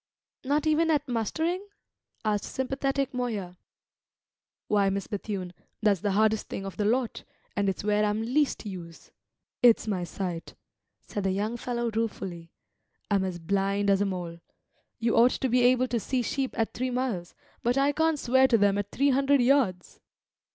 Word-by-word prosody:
"Not 290 Hz, +3 st, +1 dB
even 315 Hz, +1 st, +3 dB
at 300 Hz, -2 st, +1 dB
mustering?" 320 Hz, -, -1 dB, 0.6 s
asked 210 Hz, -1 st, 0 dB
sympathetic 270 Hz, +1 st, -1 dB
Moya. 215 Hz, -8 st, -3 dB, 1.1 s
"Why, 205 Hz, -2 st, +3 dB
Miss 195 Hz, 0 st, -2 dB
Bethune, 195 Hz, -3 st, -4 dB, 0.3 s
that's 205 Hz, -3 st, +3 dB
the 205 Hz, -2 st, 0 dB
hardest 220 Hz, +1 st, +2 dB
thing 195 Hz, -, -5 dB
of 195 Hz, -, -6 dB
the 210 Hz, -, -1 dB
lot, 240 Hz, +2 st, 0 dB, 0.3 s
and 200 Hz, -1 st, +1 dB
it's 195 Hz, -, -3 dB
where 210 Hz, 0 st, +2 dB
I'm 210 Hz, +1 st, 0 dB
least 265 Hz, +2 st, 0 dB
use. 175 Hz, -5 st, -9 dB, 0.5 s
It's 240 Hz, -2 st, +5 dB
my 195 Hz, -5 st, -1 dB
sight," 175 Hz, -1 st, -5 dB, 0.5 s
said 205 Hz, -, -5 dB
the 195 Hz, -, +1 dB
young 210 Hz, +4 st, -1 dB
fellow 240 Hz, -1 st, -2 dB
ruefully; 195 Hz, -6 st, -3 dB, 0.6 s
"I'm 200 Hz, -1 st, +3 dB
as 185 Hz, -2 st, -3 dB
blind 195 Hz, +3 st, 0 dB
as 195 Hz, 0 st, +3 dB
a -, -, +3 dB
mole. 175 Hz, -3 st, -4 dB, 0.6 s
You 230 Hz, 0 st, +1 dB
ought 240 Hz, +2 st, +6 dB
to 265 Hz, -, -1 dB
be 250 Hz, +1 st, +3 dB
able 255 Hz, +1 st, +4 dB
to 235 Hz, -, 0 dB
see 250 Hz, +3 st, -1 dB
sheep 265 Hz, +2 st, -2 dB
at 225 Hz, -2 st, 0 dB
three 255 Hz, +2 st, -2 dB
miles, 245 Hz, -9 st, -2 dB, 0.3 s
but 245 Hz, +3 st, +1 dB
I 275 Hz, +1 st, +3 dB
can't 320 Hz, +1 st, +1 dB
swear 260 Hz, 0 st, +4 dB
to 235 Hz, -, +4 dB
them 205 Hz, -1 st, +3 dB
at 205 Hz, 0 st, -3 dB
three 280 Hz, +5 st, +2 dB
hundred 275 Hz, +1 st, +3 dB
yards." 240 Hz, -9 st, +1 dB
220 Hz, 170 wpm, -27 LUFS, 195-260 Hz, 1.1 s, ought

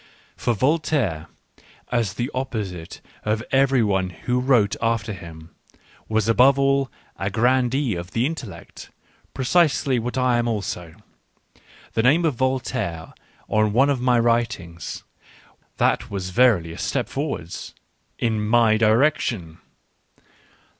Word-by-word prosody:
For 120 Hz, -2 st, -1 dB
Vol 145 Hz, +10 st, +2 dB
taire, 100 Hz, -, -1 dB, 0.6 s
as 115 Hz, -6 st, 0 dB
the 120 Hz, +6 st, -3 dB
opposite 105 Hz, -10 st, -5 dB, 0.2 s
of 110 Hz, +1 st, -1 dB
every 135 Hz, -2 st, +3 dB
one 95 Hz, -3 st, 0 dB
who 125 Hz, +7 st, -2 dB
wrote 125 Hz, -6 st, +3 dB
after 115 Hz, -2 st, 0 dB
him, 85 Hz, -2 st, -11 dB, 0.6 s
was 110 Hz, -1 st, +1 dB
above 125 Hz, +4 st, +5 dB
all 135 Hz, -1 st, +2 dB, 0.3 s
a 95 Hz, -, -2 dB
grandee 125 Hz, +3 st, +1 dB
of 85 Hz, 0 st, -5 dB
the 115 Hz, +4 st, 0 dB
intellect: 120 Hz, -, -7 dB, 0.5 s
pre 130 Hz, -, -3 dB
cisely 140 Hz, -4 st, +3 dB
what 120 Hz, +3 st, -4 dB
I 125 Hz, -2 st, +2 dB
am 120 Hz, -, 0 dB
also. 90 Hz, -7 st, -4 dB, 1.0 s
The 115 Hz, -, +2 dB
name 150 Hz, +8 st, +4 dB
of 155 Hz, -, +2 dB
Voltaire 120 Hz, -10 st, -2 dB, 0.3 s
on 110 Hz, -1 st, +1 dB
one 135 Hz, +5 st, +4 dB
of 130 Hz, -3 st, -1 dB
my 125 Hz, -1 st, +3 dB
writings 115 Hz, -8 st, -1 dB, 0.4 s
— -, -, -31 dB
that -, -, +1 dB
was 95 Hz, -2 st, -4 dB
verily 105 Hz, -8 st, +3 dB
a 85 Hz, -, -9 dB
step -, -, -1 dB
forward -, -, -4 dB, 0.4 s
— -, -, -45 dB
in 110 Hz, -2 st, -1 dB
my 110 Hz, 0 st, +4 dB
direction. 110 Hz, -, +1 dB
115 Hz, 135 wpm, -23 LUFS, 100-130 Hz, 1.0 s, above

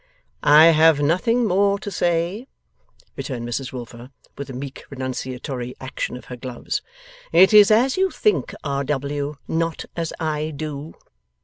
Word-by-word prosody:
'I 150 Hz, +2 st, +7 dB
have 160 Hz, -1 st, +5 dB
nothing 185 Hz, +11 st, +2 dB
more 200 Hz, 0 st, +2 dB
to 205 Hz, 0 st, -7 dB
say,' 175 Hz, +7 st, -1 dB, 0.7 s
returned 120 Hz, -4 st, -5 dB
Mrs 130 Hz, +3 st, -4 dB
Wilfer, 120 Hz, 0 st, -9 dB, 0.3 s
with 140 Hz, 0 st, -7 dB
a -, -, -6 dB
meek 135 Hz, +1 st, -7 dB
renunciatory 130 Hz, -1 st, -5 dB
action 130 Hz, -1 st, -4 dB
of -, -, -13 dB
her 125 Hz, -, -8 dB
gloves. 125 Hz, 0 st, -4 dB, 0.5 s
'It 190 Hz, +3 st, +6 dB
is 210 Hz, -1 st, +8 dB
as 245 Hz, +7 st, +3 dB
you 380 Hz, 0 st, +2 dB
think, 425 Hz, +3 st, 0 dB
R. 140 Hz, -1 st, -1 dB
W.; 145 Hz, +1 st, -2 dB
not 165 Hz, 0 st, -2 dB
as 165 Hz, -2 st, -3 dB
I 155 Hz, -1 st, -2 dB
do. 150 Hz, +1 st, -6 dB
150 Hz, 145 wpm, -22 LUFS, 130-175 Hz, 0.7 s, is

